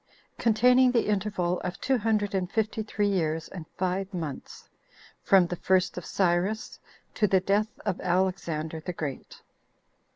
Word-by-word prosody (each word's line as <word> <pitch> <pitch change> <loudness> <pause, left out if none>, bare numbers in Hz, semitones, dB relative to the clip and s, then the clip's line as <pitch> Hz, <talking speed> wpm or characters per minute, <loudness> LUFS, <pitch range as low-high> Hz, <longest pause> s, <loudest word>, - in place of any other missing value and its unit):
Containing 250 +3 +4
The 235 - +2
Interval 195 -4 0
Of 180 -1 -5
Two 265 -2 +1
Hundred 210 -2 0
And 185 -2 -1
Fifty 220 -1 -1
Three 210 -1 -1
Years 165 -4 -1
And 170 -5 -9
Five 185 +1 -1
Months.From 175 +4 -2
The 175 - -4
First 185 0 +1
Of 180 - -7
Cyrus 195 +5 0 0.3
To 210 - +2
The 190 -1 +4
Death 200 +3 +1 0.2
Of 185 - -2
Alexander 175 -4 -1
The 175 +3 -5
Great. 145 -5 -6
190 Hz, 140 wpm, -27 LUFS, 175-210 Hz, 0.3 s, Containing